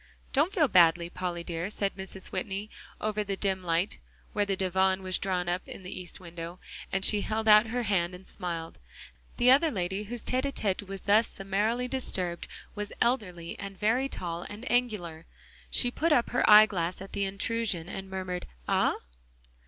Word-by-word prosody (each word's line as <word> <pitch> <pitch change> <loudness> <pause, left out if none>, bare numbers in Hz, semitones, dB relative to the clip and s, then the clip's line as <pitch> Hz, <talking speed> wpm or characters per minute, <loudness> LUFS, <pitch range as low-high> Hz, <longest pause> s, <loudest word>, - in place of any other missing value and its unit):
"Don't 300 +7 +3
feel 340 -8 +3
badly, 170 -4 +4
Polly 180 -2 -3
dear," 170 +2 -3
said 200 -1 -2
Mrs. 190 0 -6
Whitney, 205 0 -4 0.3
over 215 0 -2
in 210 - -1
the 200 - -1
dim 190 -2 0
light, 170 +3 0 0.3
where 205 -1 +1
the 195 - +1
divan 190 0 +1
was 185 -1 +1
drawn 180 -2 -1
up 175 +1 0
in - - -9
the 185 - -7
east 180 -1 -7
window, 170 -1 -8 0.3
and 195 0 +1
she 210 -1 +5
held 220 +1 -2
out 215 +1 +8
her 245 +2 -1
hand 180 -4 0
and 185 +1 -13
smiled; 170 -3 -5 0.6
the 250 +1 +6
other 290 +5 +5
lady 190 -2 -2
whose 235 +2 -5
tete 255 +2 0
a - - -2
tete 200 -7 -1
was 195 -1 -6
thus 215 +3 +4
summarily 210 +6 -1
disturbed 185 -9 -2 0.3
was 210 -1 -5
elderly 185 -9 -1
and 195 -1 -7
very 245 +6 +2
tall 170 -6 -3
and 210 +4 -8
angular. 200 -10 -1 0.4
She 245 - +5
put 325 +6 0
up 245 -5 +3
her 245 - +2
eyeglass 205 -5 +6
at 195 +1 -10
the 200 - 0
intrusion 195 -2 -1
and 195 +1 -6
murmured 185 -1 -4 0.2
"Ah?" - - +2
195 Hz, 185 wpm, -29 LUFS, 180-220 Hz, 0.6 s, out